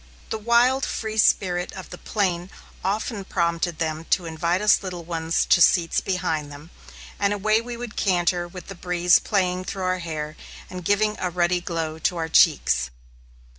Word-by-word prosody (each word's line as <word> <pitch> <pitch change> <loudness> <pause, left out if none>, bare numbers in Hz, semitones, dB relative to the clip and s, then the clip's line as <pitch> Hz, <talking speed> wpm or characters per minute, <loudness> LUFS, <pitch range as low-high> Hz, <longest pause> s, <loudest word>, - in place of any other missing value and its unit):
The 220 - -2
wild, 240 +4 +3
free 220 -1 -3
spirit 180 -4 +2
of 190 - -9
the 180 - -7
plain 185 -4 -1 0.3
often 205 +2 -2
prompted 170 -2 -1
them 160 0 -3
to 180 - +1
invite 170 +2 -1
us 210 0 +4
little 180 -3 -6
ones 165 -1 -1
to 175 - +4
seats 170 -1 +4
behind 160 -6 -2
them, 145 +4 -12 0.5
and 200 0 +2
away 215 +2 +2
we 240 0 -7
would 240 -2 -7
canter 175 -2 +1
with 180 +1 -10
the 195 - -8
breeze 180 0 +3
playing 185 -3 0
through 190 0 -4
our 185 0 0
hair 155 -2 -5 0.4
and 180 -1 -7
giving 210 +3 +1
a 180 - -1
ruddy 175 0 +1
glow 165 -2 -3
to 175 +2 0
our 160 -1 -2
cheeks. 65 - +3
180 Hz, 170 wpm, -24 LUFS, 165-200 Hz, 0.5 s, us